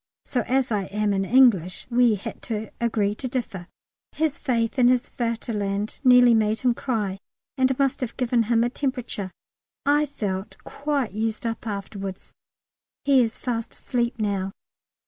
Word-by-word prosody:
So 250 - 0
as 260 -1 +1
I 205 -3 0
am 210 +1 0
an 195 0 0
English 200 -7 +4
we 240 -2 +4
had 195 - -7
to 220 -1 -3
agree 215 -3 +1
to 255 +5 -5
differ. 225 -8 -4 0.5
His 310 -2 0
faith 235 0 0
in 245 - +6
his 250 0 +3
Vaterland 215 -3 -2
nearly 250 -2 +7
made 220 -1 +2
him 250 -2 +3
cry 210 -7 -2 0.4
and 260 -1 +2
must 275 0 +1
have 245 -3 -4
given 245 -2 +2
him 230 -1 +4
a 240 - +1
temperature. 250 -8 -3 0.6
I 295 +1 +3
felt 200 -8 -4
quite 280 -6 -2
used 220 +2 -2
up 230 0 -3
afterwards. 195 -2 -6 0.7
He 275 -2 +5
is 230 -1 -1
fast 230 -3 -3
asleep 240 -1 -2
now. 200 -3 -1
230 Hz, 155 wpm, -24 LUFS, 205-255 Hz, 0.7 s, nearly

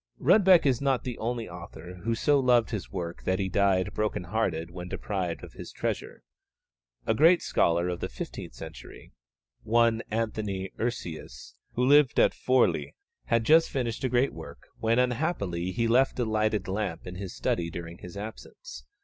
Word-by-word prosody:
Rudbeck 190 -6 +6
is 130 -3 +2
not 135 -4 +1
the 125 -2 -5
only 115 0 -2
author 90 +1 -10
who 115 +3 0
so 145 +4 +3
loved 125 -4 +3
his 105 -4 -4
work 85 -3 -5
that 95 - +1
he 95 -1 -1
died 95 -1 +2
broken 105 -4 -1
hearted 85 -4 -2
when 90 0 -7
deprived 90 -4 -3
of - - -10
his - - -9
treasure. - - -4 0.8
A 110 - +2
great 165 +8 +5
scholar 85 +1 +2
of 90 -1 -3
the - - -4
fifteenth - - -7
century, - - -11 0.5
one 115 0 +3
Anthony 105 -4 -2
Urseus, 85 - -5 0.2
who 125 - +1
lived 145 -1 +5
at - - +5
Forli, 130 0 +1 0.3
had 115 -1 +2
just 160 +6 +5
finished 120 -3 -3
a 130 - +1
great 125 +3 +2
work, - - -10 0.2
when 115 +1 +2
unhappily 125 - 0
he 115 +4 0
left 130 +4 +3
a 125 - 0
lighted 110 -2 0
lamp 100 +1 -3
in 90 - -7
his 95 0 -7
study 85 -1 -1
during 85 +1 -8
his 90 +2 -10
absence. 100 -10 -9
110 Hz, 170 wpm, -28 LUFS, 90-125 Hz, 0.8 s, Rudbeck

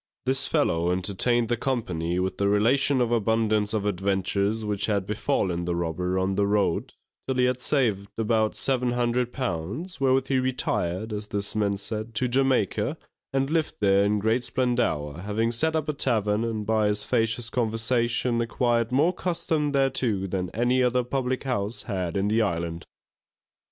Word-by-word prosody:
This 135 +1 +2
fellow 85 - +1
entertained 105 +6 +1
the 120 - +1
company 90 -10 -2
with 95 +1 -2
the 100 0 +2
relation 130 +6 +3
of 120 -1 +1
abundance 110 -2 +1
of 105 -2 -1
adventures 100 +2 0
which 105 -1 -1
had 100 -3 0
befallen 95 -4 -1
the 85 0 -1
robber 85 +2 -1
on 95 +1 0
the 100 +1 +1
road, 100 -4 0 0.3
till 130 - 0
he 125 0 +3
had 125 0 0
saved 115 -8 0
about 110 -1 +1
seven 125 -2 0
hundred 120 0 0
pounds, 125 - -4
wherewith 135 0 +3
he 135 -1 +2
retired 110 -5 -1
(as 105 0 -5
this 100 0 -3
man 100 -2 +1
said) 110 +2 -5
to 125 +4 +1
Jamaica, 130 -4 +1 0.3
and 135 +1 0
lived 160 -1 0
there 100 -1 +4
in 105 +1 +2
great 110 +4 +1
splendour, 120 - 0
having 105 +4 -1
set 160 +7 0
up 155 -1 -1
a 150 - 0
tavern, 110 -6 +1
and 110 -2 -3
by 110 -1 +2
his 105 0 0
facetious 115 -1 0
conversation, 120 +1 0
acquired 115 0 0
more 150 +8 +3
custom 165 -5 -1
thereto 130 -7 +1
than 90 -1 -2
any 120 +5 +1
other 125 0 +2
public 130 0 -2
house 120 -4 -2
had 95 -4 -3
in 100 +1 +1
the 110 +2 +2
Island. 85 -4 -2
110 Hz, 165 wpm, -26 LUFS, 100-125 Hz, 0.3 s, there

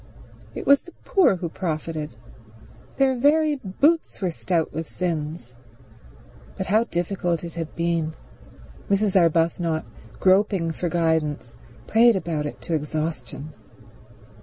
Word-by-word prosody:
It - - -5
was 280 0 +6
the 350 - -15
poor 370 - +4
who 175 -1 -4
profited. 155 - -4 0.8
Their 270 -1 +3
very 295 +3 +3
boots 280 - +1
were 185 -3 -1
stout 165 0 -1
with 160 0 -4
sins. 155 -7 -3 1.0
But 190 - -2
how 215 +5 +3
difficult 175 -3 -1
it 170 -1 -6
had 165 -2 -5
been. 170 -2 -1 0.7
Mrs. 200 0 +2
Arbuthnot, 165 -1 +2 0.3
groping 190 -3 +3
for 175 +2 -3
guidance, 160 -6 0 0.3
prayed 230 - +5
about 160 -5 -2
it - - -8
to 170 - -4
exhaustion. 155 -2 -3
170 Hz, 120 wpm, -24 LUFS, 160-200 Hz, 1.0 s, was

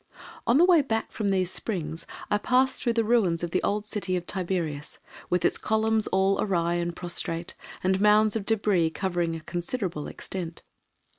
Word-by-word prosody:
On 235 - +5
the 340 - +7
way 350 -4 +6
back 225 -5 -2
from 210 -3 -1
these 185 -2 +1
springs 165 -7 -4 0.2
I 205 - +3
passed 255 +4 +2
through 235 - +1
the 230 -1 +2
ruins 210 -8 +2
of 170 - -3
the - - +1
old 210 +1 -1
city 205 -3 -2
of 175 - -5
Tiberias, 170 -6 -3 0.3
with 180 0 +1
its - - +2
columns 220 0 +1
all 190 +1 +2
awry 170 -4 +1
and 175 0 -2
prostrate, 170 -1 -3 0.3
and 190 +1 +2
mounds 210 +1 +5
of 215 -3 -2
débris 195 -7 +2
covering 175 -3 -1
a 165 - -6
considerable 175 -1 -4
extent. 170 -3 -6
190 Hz, 175 wpm, -27 LUFS, 170-220 Hz, 0.3 s, the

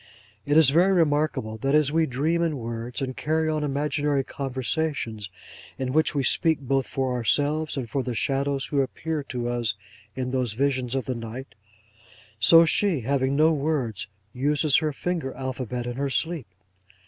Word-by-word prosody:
It 145 +1 +3
is 155 -4 +7
very 180 +6 +4
remarkable, 150 -9 +1
that 135 +6 +1
as 150 -2 +3
we 160 0 +2
dream 155 +7 0
in 165 -4 0
words, 115 +2 -5
and 130 -1 -4
carry 160 +1 0
on 155 -1 0
imaginary 145 0 0
conversations, 130 -5 -3 0.5
in 130 -1 -3
which 155 0 +2
we 140 - +1
speak 160 +4 +2
both 135 -1 0
for 130 -2 -1
ourselves 145 +6 +1
and 130 -3 -3
for 135 +4 -1
the 125 -2 -4
shadows 135 +2 0
who 140 -2 +1
appear 155 +3 -3
to 120 -2 -4
us 120 -4 -1 0.4
in 125 -1 -3
those 125 -4 -1
visions 130 0 0
of 135 - -1
the 130 - -2
night, 120 +3 -7 0.9
so 165 +8 +7
she, 170 -2 +2
having 135 +2 0
no 155 +2 +5
words, 135 -9 -1 0.3
uses 145 +2 +2
her 155 -1 0
finger 160 -2 -3
alphabet 125 -2 -4
in 120 0 -5
her 140 0 -1
sleep. 160 0 -1
135 Hz, 170 wpm, -25 LUFS, 125-155 Hz, 0.9 s, is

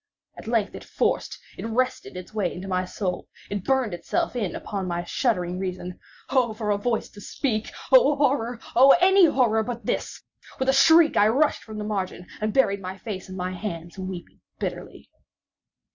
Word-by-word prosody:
At - - -11
length 225 -3 0
it - - -8
forced—it - - -3
wrestled 230 -3 -2
its 180 +3 -9
way 200 -5 0
into 185 +2 -7
my 185 -1 0
soul—it 190 +1 -5
burned 265 -4 +1
itself 175 +7 -2
in 210 -7 -2
upon 195 -3 -4
my 175 0 -2
shuddering 180 -3 -1
reason. 180 -1 -5 0.3
Oh! 250 -5 +2
for 215 -1 -2
a 205 - +2
voice 230 +1 -1
to 205 - -13
speak!—oh! 280 - +2
horror!—oh! 260 -1 +3
any 380 0 +6
horror 235 -7 +2
but 235 -1 -5
this! - - -3 0.3
With 265 0 0
a - - +5
shriek, 320 +3 +6
I 205 - +6
rushed 275 +7 +2
from 220 -1 -9
the 210 - -3
margin, 195 -4 -3 0.2
and 215 0 0
buried 200 -6 +2
my 185 0 -6
face 190 -2 -7
in 185 - -7
my 180 0 -3
hands—weeping 180 -1 -7 0.2
bitterly. - - -6
215 Hz, 165 wpm, -25 LUFS, 185-250 Hz, 0.3 s, any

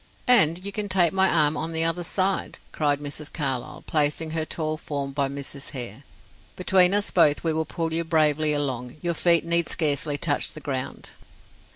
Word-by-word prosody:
"And 185 -7 +4
you 200 - -2
can 205 0 -3
take 185 -2 +3
my 190 0 +3
arm 155 -2 +3
on 165 +1 -4
the 160 0 +1
other 165 +2 -1
side," 190 +2 -1
cried 145 -2 0
Miss 145 +1 -7
Carlyle, 135 -5 -3
placing 155 +1 0
her 160 -1 -1
tall 155 -1 -3
form 140 -3 -5
by 140 0 0
Mrs. 140 0 -5
Hare. 120 -2 -5 0.5
"Between 185 0 +4
us 205 0 +1
both 150 -5 +3
we 165 -1 0
will 160 0 -1
pull 165 0 -3
you 165 +1 0
bravely 155 -2 +2
along; 130 -3 -2
your 175 -1 -1
feet 170 0 +2
need 170 0 +2
scarcely 150 -2 +2
touch 145 0 0
the 155 - -9
ground." 135 -3 -5
155 Hz, 185 wpm, -25 LUFS, 145-170 Hz, 0.5 s, And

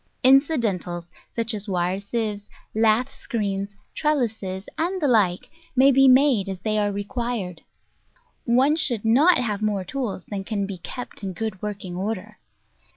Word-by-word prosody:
Incidentals, 230 - +2 0.3
such 230 0 0
as 210 0 -4
wire 180 0 0
sieves, 205 0 -3 0.2
lath 225 +4 +2
screens, 200 -4 -3 0.2
trellises, 220 -10 -1
and 360 +4 -1
the 300 - +1
like, 205 -8 +2 0.2
may 265 +2 +6
be 270 0 +6
made 255 -6 +5
as 190 -2 -5
they 215 +1 0
are 205 -1 +1
required. 205 -3 -3 0.8
One 260 +5 +4
should 240 -9 0
not 280 +11 +5
have 215 -4 -2
more 210 -3 0
tools 220 -3 -4
than 200 -2 -5
can 200 -1 -2
be 195 -2 -6
kept 245 +8 -8
in 195 -2 -4
good 215 -1 -4
working 200 -4 -5
order. 210 +2 -4
215 Hz, 150 wpm, -24 LUFS, 195-250 Hz, 0.8 s, may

